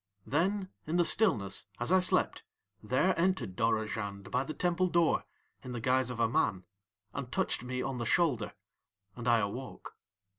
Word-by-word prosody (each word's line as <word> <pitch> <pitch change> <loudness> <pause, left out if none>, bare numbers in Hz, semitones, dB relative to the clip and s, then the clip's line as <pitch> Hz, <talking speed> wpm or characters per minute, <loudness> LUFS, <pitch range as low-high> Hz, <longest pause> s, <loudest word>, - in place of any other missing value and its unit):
Then 185 +6 0 0.2
in 160 - -1
the 175 -1 +4
stillness, 105 - +2
as 120 +8 0
I 185 - +6
slept, 185 - +2 0.4
there 130 - +2
entered 180 - 0
Dorozhand 105 -3 -1
by 125 +1 +1
the 155 - -5
temple 180 +1 +1
door 170 -2 +2 0.4
in 125 -2 -7
the 120 - -3
guise 130 +2 +2
of 125 -2 -5
a 115 - +4
man, 95 -4 +1 0.5
and 135 -3 -5
touched - - 0
me 125 0 -3
on 135 -2 -3
the 120 - -2
shoulder, 125 -12 +1 0.6
and 120 -1 -6
I 120 -1 +5
awoke. 115 +5 -5
125 Hz, 165 wpm, -31 LUFS, 115-170 Hz, 0.6 s, I